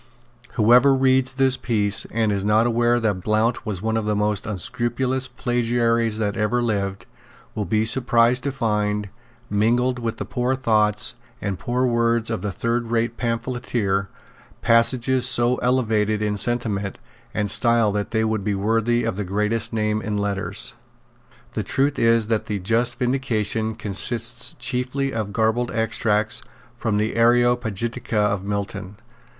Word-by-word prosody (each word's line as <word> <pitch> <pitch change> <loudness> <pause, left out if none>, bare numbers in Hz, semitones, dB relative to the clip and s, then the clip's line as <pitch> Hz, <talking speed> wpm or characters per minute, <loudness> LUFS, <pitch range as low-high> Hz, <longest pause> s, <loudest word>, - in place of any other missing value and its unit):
Whoever 125 +4 +5
reads 130 0 +2
this 130 0 +2
piece, 105 -4 0
and 110 -1 0
is 100 -1 -1
not 105 +2 +3
aware 120 0 +2
that 105 -5 -1
Blount 110 +4 0
was 100 -3 -3
one 110 0 0
of 110 - -2
the 105 0 0
most 105 +1 -1
unscrupulous 120 +6 -2
plagiaries 120 -2 0
that 105 -2 -1
ever 105 +3 0
lived, 100 -5 -2 0.5
will 105 - -3
be 110 +4 +1
surprised 120 +1 +2
to 140 - 0
find, 105 -5 -1 0.4
mingled 120 +4 +1
with 115 -2 -3
the - - -4
poor 125 +1 -1
thoughts 105 -5 +1 0.3
and 100 -2 -4
poor 125 0 0
words 115 -1 +1
of 110 - -3
a 105 - -2
thirdrate 115 +2 -1
pamphleteer, 115 -5 -2 0.5
passages 125 +2 +3
so 120 0 +2
elevated 110 -4 +1
in 105 -1 -1
sentiment 105 -2 0 0.3
and 105 -2 -1
style 115 -2 +4
that 105 0 -2
they 110 -1 0
would 110 -2 -1
be 105 0 -1
worthy 115 +4 +1
of - - -2
the 105 - -2
greatest 105 +4 -1
name 110 -1 -1
in 105 -1 -3
letters. 100 0 -3 0.8
The 110 - -2
truth 135 +8 0
is 115 -1 +3
that 110 0 -1
the 105 - -2
just 115 +5 0
Vindication 115 -4 -1
consists 115 +2 +1
chiefly 125 +2 -1
of 110 -3 -3
garbled 110 +3 0
extracts 110 -1 0 0.3
from 110 -3 -1
the 110 +1 0
Areopagitica 120 -1 +1
of 105 -2 +1
Milton. 100 -1 -4
115 Hz, 145 wpm, -22 LUFS, 105-120 Hz, 0.8 s, Whoever